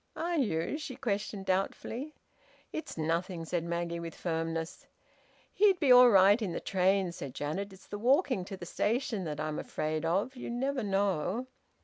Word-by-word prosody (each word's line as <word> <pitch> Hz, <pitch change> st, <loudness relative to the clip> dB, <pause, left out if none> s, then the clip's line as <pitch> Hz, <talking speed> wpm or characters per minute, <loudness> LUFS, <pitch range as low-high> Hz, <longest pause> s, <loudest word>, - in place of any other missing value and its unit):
"Are 340 Hz, 0 st, -1 dB
you?" 205 Hz, -, 0 dB
she 275 Hz, -4 st, -6 dB
questioned 205 Hz, -4 st, -3 dB
doubtfully. 225 Hz, +9 st, -2 dB, 0.6 s
"It's 315 Hz, -, -5 dB
nothing," 165 Hz, +2 st, -1 dB
said 170 Hz, 0 st, -1 dB
Maggie, 170 Hz, 0 st, -2 dB
with 170 Hz, -1 st, -6 dB
firmness. 165 Hz, -1 st, -3 dB, 0.7 s
"He'd 395 Hz, -3 st, +4 dB
be 280 Hz, -5 st, +4 dB
all 250 Hz, 0 st, +9 dB
right 200 Hz, +2 st, +6 dB
in 190 Hz, -6 st, -2 dB
the -, -, -2 dB
train," 190 Hz, -1 st, +1 dB
said 140 Hz, -7 st, -7 dB
Janet. 185 Hz, +8 st, -3 dB
"It's 190 Hz, -1 st, -15 dB
the 205 Hz, -, -6 dB
walking 255 Hz, -, +2 dB
to 195 Hz, -, -7 dB
the 175 Hz, -, -8 dB
station 220 Hz, 0 st, -1 dB
that 150 Hz, -2 st, -4 dB
I'm 155 Hz, -1 st, -2 dB
afraid 155 Hz, 0 st, -2 dB
of... 195 Hz, +11 st, 0 dB
You 250 Hz, -, -6 dB
never 260 Hz, +3 st, -1 dB
know." 200 Hz, +1 st, 0 dB
195 Hz, 165 wpm, -31 LUFS, 170-245 Hz, 0.7 s, all